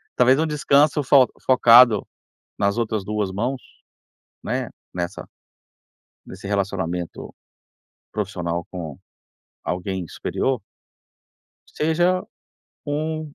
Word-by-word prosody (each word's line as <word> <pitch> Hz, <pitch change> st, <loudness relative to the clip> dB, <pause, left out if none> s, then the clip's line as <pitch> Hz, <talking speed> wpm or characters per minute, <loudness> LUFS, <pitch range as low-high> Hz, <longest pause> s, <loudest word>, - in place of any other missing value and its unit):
Talvez 130 Hz, +3 st, +4 dB
um 160 Hz, -, +1 dB
descanso 150 Hz, -1 st, +3 dB
fo 130 Hz, -1 st, +6 dB, 0.2 s
focado 120 Hz, -3 st, +7 dB, 0.5 s
nas 100 Hz, +1 st, +1 dB
outras 110 Hz, -3 st, -1 dB
2 105 Hz, -2 st, -2 dB
mãos, 125 Hz, +7 st, -2 dB, 0.8 s
né, -, -, -3 dB, 0.2 s
nessa 90 Hz, +2 st, -4 dB, 1.0 s
nesse 95 Hz, +1 st, -10 dB
relacionamento 95 Hz, -4 st, -3 dB, 0.8 s
profissional 90 Hz, -5 st, -3 dB
com 80 Hz, -6 st, -7 dB, 0.7 s
alguém 90 Hz, 0 st, -3 dB
superior 130 Hz, -, -2 dB, 1.1 s
seja 175 Hz, +4 st, +1 dB, 0.6 s
um 155 Hz, +2 st, -2 dB
110 Hz, 85 wpm, -22 LUFS, 95-140 Hz, 1.1 s, focado